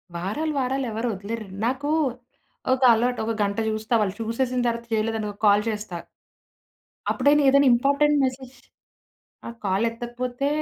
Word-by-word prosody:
వారాలు 215 - -2
వారాలు 265 +1 -1
ఎవరు 225 +3 -2
వదిలేరు. 215 +3 -5 0.2
నాకు 265 +4 -1 0.8
ఒక 260 - -2
అలవాటు. 245 +2 0
ఒక 225 - -1
గంట 200 0 -2
చూస్తా, 220 +2 -3
వాళ్ళు 195 -2 -1
చూసేసిన 245 +2 -1
తరువాత 235 0 -2
చేయలేదనుకో 215 -1 -1
కాల్ 205 0 +5
చేస్తా. 210 -5 -4 1.1
అప్పుడైనా 285 +3 +3
ఏదైనా 280 0 +5
ఇంపార్టెంట్ 280 +4 +3
మెసేజ్ 260 0 -4 0.9
ఆ - - -5
కాలెత్తకపోతే 240 +6 -2
235 Hz, 125 wpm, -24 LUFS, 215-260 Hz, 1.1 s, కాల్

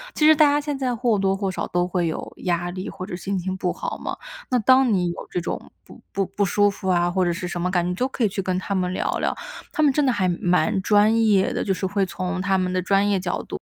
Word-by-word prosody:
其 305 - +2
实 310 0 +8
大 305 - +5
家 290 - +2
现 295 -1 -3
在 255 -2 -1
或 230 -3 +1
多 195 0 +2
或 195 -2 -1
少 - - -3
都 175 0 0
会 180 -2 0
有 160 - -5
压 175 0 0
力， 185 +1 -5
或 185 -1 -7
者 180 - -6
心 190 +2 -3
情 185 +1 -3
不 185 -1 -1
好 - - -5
嘛。 - - -5 0.3
那 255 - +2
当 255 +2 +4
你 180 -4 +1
有 - - -8
这 - - -2
种 170 - -5
不 - - -15
不 195 - 0
不 200 +2 -2
舒 205 +2 +3
服 190 -1 -5
啊， 175 -1 +3
或 185 0 +1
者 175 - +1
是 180 +1 -4
什 175 0 -4
么 180 - 0
感 175 -1 +1
觉， - - -1
你 180 - -2
就 250 +7 0
可 260 -2 -3
以 - - +5
去 195 0 -3
跟 185 -1 -1
他 185 +2 -3
们 180 -2 0
聊 185 - -2
聊。 - - -1 0.4
他 310 - 0
们 285 -3 +4
真 295 - +2
的 260 - +3
还 195 -5 0
蛮 180 +3 +1
专 215 +3 +4
业 195 -2 +3
的， - - -1
就 195 - -1
是 190 0 -1
会 200 +1 0
从 185 0 -3
他 195 0 +1
们 185 -1 0
的 185 - +1
专 195 +2 +2
业 200 -2 +2
角 180 -1 -3
度 - - -6
190 Hz, 310 characters per minute, -23 LUFS, 180-210 Hz, 0.4 s, 实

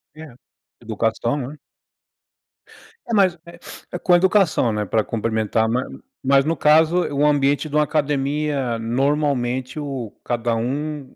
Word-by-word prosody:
Eh, 155 -6 -11 0.5
eduação, 115 +3 -1
né? 145 +3 -6 1.5
É, 230 - -3
mas, 185 -4 +3
eh, 175 +1 -10
com 180 -1 +4
educação, 180 - +3
né, 105 -1 -2
para 110 +2 +1
cumprimentar. 110 0 -1 0.6
Mas, 135 +1 +3
no 165 +1 0
caso, 160 +4 +4
o 145 +1 +2
ambiente 145 +1 +2
de 150 - -5
uma 150 - +4
academia, 145 -3 -1
normalmente, 130 +1 -1
o 135 -7 -5
cada 120 -1 -1
um 140 +4 -4
140 Hz, 125 wpm, -21 LUFS, 120-155 Hz, 1.5 s, com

